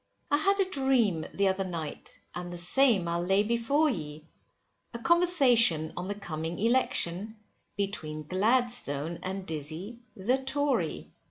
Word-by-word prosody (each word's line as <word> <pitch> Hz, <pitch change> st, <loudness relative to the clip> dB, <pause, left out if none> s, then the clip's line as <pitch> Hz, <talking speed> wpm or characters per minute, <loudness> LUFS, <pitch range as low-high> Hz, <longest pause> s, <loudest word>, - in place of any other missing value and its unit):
I 290 Hz, -, +4 dB
had 395 Hz, +6 st, +2 dB
a 390 Hz, -, +3 dB
dream 260 Hz, -, +1 dB
the 200 Hz, 0 st, +1 dB
other 190 Hz, 0 st, 0 dB
night; 165 Hz, -5 st, -6 dB
and 175 Hz, 0 st, -6 dB
the 175 Hz, -, -6 dB
same 195 Hz, +1 st, +4 dB
I'll 170 Hz, +1 st, -1 dB
lay 195 Hz, +3 st, +2 dB
before 235 Hz, +8 st, +1 dB
ye, 155 Hz, -, -5 dB, 0.7 s
A -, -, -2 dB
conversation 245 Hz, -, +4 dB
on 180 Hz, +1 st, -5 dB
the 205 Hz, -, -3 dB
coming 165 Hz, -4 st, -5 dB
election, 215 Hz, -3 st, 0 dB, 0.4 s
between 155 Hz, -7 st, -3 dB
Gladstone 185 Hz, -, 0 dB
and 190 Hz, 0 st, -5 dB
Dizzy, 160 Hz, +9 st, -5 dB, 0.2 s
the 240 Hz, +8 st, 0 dB
Tory. 280 Hz, +1 st, -1 dB
200 Hz, 140 wpm, -28 LUFS, 170-255 Hz, 0.7 s, I